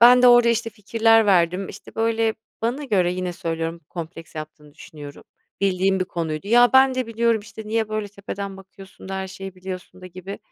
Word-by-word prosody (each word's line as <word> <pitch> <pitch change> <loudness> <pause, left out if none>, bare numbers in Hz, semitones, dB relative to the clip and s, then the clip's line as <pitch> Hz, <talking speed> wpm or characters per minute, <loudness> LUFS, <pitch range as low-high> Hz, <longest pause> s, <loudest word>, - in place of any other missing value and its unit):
Ben 245 +1 +8
de 250 - +8
orada, 240 -1 +7
işte, 230 0 0
fikirler 225 +1 +3
verdim, 180 0 +2
işte, 195 - -12
böyle 225 0 +1 0.3
Bana 245 +6 -1
göre 185 -8 +2
yine 180 0 -3
söylüyorum, 165 0 -4
kompleks 165 -1 -8
yaptığını 155 -1 -9
düşünüyorum. 145 -2 -11 0.4
Bildiğim 190 0 +2
bir - - +2
konuydu. 165 -1 -4
"Ya 240 +1 +6
ben 265 0 +6
de 255 -2 -1
biliyorum, 230 0 +1
işte, 220 +1 -10
niye 220 0 0
böyle 215 -1 -3
tepeden 200 -1 -6
bakıyorsun." 195 0 -14
da, 195 - -4
"Her 190 0 -3
şeyi 195 0 -8
biliyorsun." 185 0 -8
da, 185 - -9
gibi 185 +2 -8
195 Hz, 190 wpm, -23 LUFS, 180-225 Hz, 0.4 s, Ben